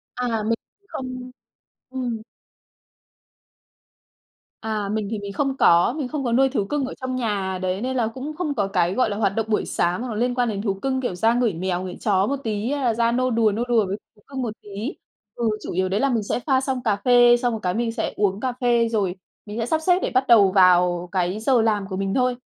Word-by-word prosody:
À, 230 -3 -1
mình 230 +2 +1 0.3
không 255 -1 -6 0.6
ừm. 250 -4 -3 2.4
à, 215 -2 -2
mình 215 0 -2
thì 220 - -2
mình 200 -1 -6
không 275 +3 -1
có, 175 +4 +5
mình 285 -5 -2
không 290 +1 -4
có 240 - -1
nuôi 270 +3 +4
thú 255 -7 -1
cưng 285 +5 -1
ở 260 - -6
trong 260 0 -3
nhà, 200 -6 -2
đấy, 185 +2 -1
nên 260 +1 -2
là 235 -3 +1
cũng 265 +7 -6
không 305 -3 -2
có 205 -7 0
cái, 180 -2 +1
gọi 250 0 +2
là, 205 - -3
hoạt 200 -2 0
động 225 - 0
buổi 215 - +1
sáng 175 +4 0
hoặc 250 - -4
là - - -5
liên 245 +3 0
quan 245 -2 +1
đến 200 -2 -3
thú 200 -2 0
cưng, 260 +7 -2
kiểu, 245 -8 -2
ra 225 +6 +3
ngửi 240 -4 +1
mèo, 180 +1 -2
ngửi 185 -1 -6
chó 195 -2 +3
một 280 - 0
tí 215 +1 -2
hay 285 -1 -1
là 235 - +3
ra 230 +1 +1
nô 255 +2 +1
đùa, 225 -2 +3
nô 220 +4 -1
đùa 230 -3 +3
với 195 - -3 0.2
thú 210 - -24
cưng 270 -2 -5
một 230 -4 -3
tí 210 - -14 0.7
ừ, 235 -2 0
chủ - - -5
yếu 185 +1 0
đấy 195 +2 0
là 275 - +2
mình 230 -4 0
sẽ 205 - -2
pha 260 0 +1
xong 265 -2 -2
cà 215 -3 +2
phê, 240 +3 +5
xong 245 -1 0
rồi 220 - -3
cái 180 - 0
mình 230 +2 -1
sẽ 225 -1 -3
uống 200 -1 0
cà 255 +2 -2
phê, 235 -2 +3
rồi 200 -5 0 0.3
mình 210 +2 -6
sẽ 230 - 0
sắp 315 +6 0
xếp 360 +2 +3
để - - -2
bắt 260 +1 +2
đầu 205 -5 +6
vào 180 -2 +4
cái 185 +1 -1
giờ 240 +1 +3
làm 210 -3 +1
của 190 - -5
mình 195 0 -1
thôi. 250 0 +1
225 Hz, 250 wpm, -23 LUFS, 200-250 Hz, 2.4 s, đầu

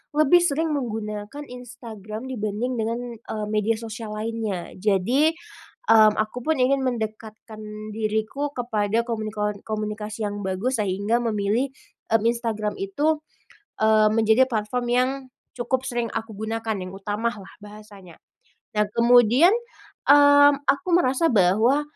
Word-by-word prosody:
lebih 310 +3 +5
sering 320 -1 0
menggunakan 220 0 -4
Instagram 235 -4 -9
dibanding 225 +2 -3
dengan, 230 +2 -1 0.2
mmm, 215 -2 -5
media 215 +1 +1
sosial 220 -1 -7
lainnya. 215 -4 -4
Jadi, 235 - +2 0.6
mmm, 215 -1 +7
aku 215 +3 -2
pun 315 +5 0
ingin 265 +1 +2
mendekatkan 215 -2 -6
diriku 220 +6 -2
kepada 225 -2 0
komunikon 215 -3 -3
komunikasi 215 0 -4
yang 205 0 -3
bagus, 205 +6 -2
sehingga 205 +4 0
memilih, 220 +2 0 0.5
mmm, 220 - +2
Instagram 230 - -1
itu, 315 -6 0 0.6
mmm, 215 0 +4
menjadi 220 +3 +4
platform 225 +3 -2
yang 250 +1 +3 0.5
cukup 255 +2 -2
sering 240 -2 -2
aku 225 -1 -5
gunakan, 220 +1 -3
yang 185 - -8
utama 205 +4 -2
lah 200 -3 -12
bahasanya. 205 -4 -13 0.6
Dan 210 0 +1
kemudian, 245 - +5 0.5
mmm, 285 0 +7 0.2
aku 280 +6 +1
merasa 330 -2 +3
bahwa, 220 +9 +3
225 Hz, 125 wpm, -24 LUFS, 210-250 Hz, 0.6 s, mmm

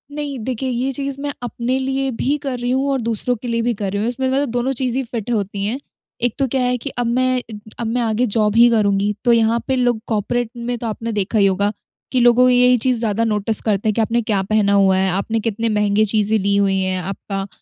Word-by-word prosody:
नहीं, 290 -2 -4
देखिए 255 +3 -3
ये 255 +2 -1
चीज़ 275 0 -4
मैं 290 0 -2
अपने 245 +1 -2
लिए 270 0 -1
भी 285 +3 +1
कर 260 -3 -3
रही 245 0 -2
हूँ 265 +2 +1
और 270 - 0
दूसरों 230 +2 -1
के 240 +2 -8
लिए 230 0 0
भी 240 0 0
कर 200 -2 -4
रही 200 - -2
हूँ। 220 - 0
इसमें 260 +2 -2
मतलब 275 0 0
दोनों 245 +3 -1
चीज़ 255 0 -1
ही 270 - 0
फिट 230 -1 -5
होती 200 -2 -2
है। 225 +5 -1 0.5
एक 245 - +1
तो 270 - +2
क्या 260 +1 0
है 250 0 +1
कि 265 +4 -5
अब 240 - 0
मैं 255 +1 +1 0.4
अब 230 - -2
मैं 245 +2 0
आगे 230 +1 +1
जॉब 210 -1 +2
ही 235 +1 +7
करुँगी। 205 -2 +1
तो 240 - +5
यहाँ 230 0 +3
पे 265 - +1
लोग 245 -3 +1
कॉर्पोरेट 225 +2 -1
में 240 +1 -3
तो 230 0 -5
आपने 230 +1 -4
देखा 210 +1 -1
ही 200 - +5
होगा 200 +1 +1 0.4
कि 255 - +2
लोगों 245 +1 +5
यही 250 0 +5
चीज़ 245 0 0
ज्यादा 225 0 0
नोटिस 215 0 +2
करते 210 0 0
हैं 215 - +1
कि 230 - 0
आपने 230 +2 +1
क्या 210 -3 0
पहना 200 0 +1
हुआ 190 -1 +4
है, 190 0 +2
आपने 210 +4 -1
कितने 225 +1 -1
महँगे 210 0 +2
चीज़ें 215 +1 +2
ली 200 +1 +1
हुई 195 -1 +2
हैं, 185 0 0
आपका 195 +1 -5
230 Hz, 250 wpm, -19 LUFS, 210-250 Hz, 0.5 s, ही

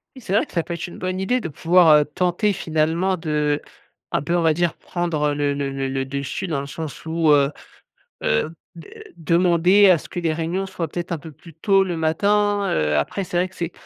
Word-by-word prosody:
Oui, 260 - -11
c'est 200 - -8
vrai 205 - +3
que - - -20
ça 170 - 0
peut 170 - -5
être 170 - -5
une 175 - -11
bonne 185 0 -3
idée 245 +7 0
de 170 - -4
pouvoir, 165 +2 +4
heu, 150 - +2
tenter 180 +6 0
finalement 165 +1 0
d'un 150 -3 0 0.7
peu 170 +3 +1
on - - +1
va 160 -1 +3
dire, 175 +1 0
prendre 160 -4 -2
le 145 0 0
le 140 -1 -2
le 135 0 -3
le 135 0 -2
dessus 140 +7 -4
dans 150 -5 -2
le 140 - -7
sens 150 0 -7
où, 160 -1 +2
heu 140 -1 +4 0.7
heu, 150 - 0 0.2
de 165 - -12 0.3
demander 175 +4 +4
à 175 - +5
ce - - -12
que 175 - -5
les 165 -2 0
réunions 165 +4 -2
soient 185 -3 -4
peut-être 175 +3 -6
un 170 - -2
peu 155 +2 -11
plus 165 +3 -16
tôt 195 +4 +3
le 180 -3 -2
matin. 205 +5 +1
Heu, 75 -1 +1
après, 75 - -1
c'est 175 - -2
vrai 180 +1 +1
que 190 - -21
c'est 170 0 -4
165 Hz, 230 wpm, -22 LUFS, 150-185 Hz, 0.7 s, à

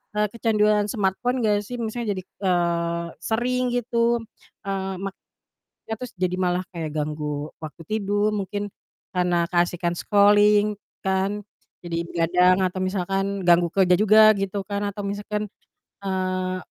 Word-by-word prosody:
eee, 210 0 +2
kecanduan 210 -2 +2
smartphone 230 +4 0
enggak 210 -1 +3
sih? 245 - -6
Misalnya 225 -2 -2
jadi, 185 - -6
eee, 170 -3 -1
sering 250 +3 0
gitu, 235 -1 +1 0.4
eee, 195 -1 -3
mak 195 -1 -4 0.7
ya 220 - -1
terus 250 -1 -7
jadi 180 -1 -1
malah 180 0 +1
kayak 160 -4 -5
ganggu 150 -1 -3
waktu 160 +1 -9
tidur 205 0 0
mungkin, 205 0 -3 0.4
karena 180 -1 +1
keasikan 175 -1 +1
scrolling 205 +1 +4 0.3
kan, 195 +2 0 0.4
jadi 170 -1 -3
begadang 180 +3 +3
atau 185 0 -1
misalkan 195 +1 -1
ganggu 175 0 +5
kerja 185 -2 +4
juga, 215 +1 +7
gitu 195 +1 -2
kan, 200 -1 -2
atau 200 0 -5
misalkan, 205 +1 -3 0.5
eee, 185 -1 -1
195 Hz, 135 wpm, -24 LUFS, 180-210 Hz, 0.7 s, juga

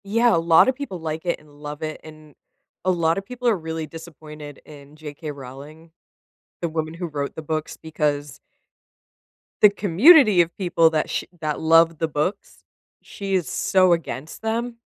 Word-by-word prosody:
Yeah, 230 +2 +3
a - - +2
lotta 165 +10 +5
people 255 -9 -7
like 160 +1 -5
it 170 - -1
and 150 -1 -21
love 150 +1 -7
it, 155 0 -5
and 155 -1 -14 0.5
a 185 - 0
lotta 170 +1 +1
people 250 +4 -5
are 225 -4 +3
really 160 -1 -5
disappointed 150 -2 -11
in 145 -1 -14
J.K. 150 0 -8
Rowling, 145 +4 -12 0.7
the 170 - -1
woman 160 0 -3
who 175 +1 -5
wrote 145 -3 -4
the - - -6
books, 155 0 -4
because 145 -3 -3 1.2
the 210 - +9
community 205 - +6
of 170 0 -2
people 170 -4 +3
that 155 -1 -1
sh - - -2 0.2
that 155 -2 -3
loved 165 0 +4
the 160 - 0
books, 155 +6 -4 0.4
she 195 -1 -4
is 175 -6 0
so 185 +7 +3
against 160 -3 -5
them 230 +2 -3
160 Hz, 165 wpm, -22 LUFS, 155-185 Hz, 1.2 s, the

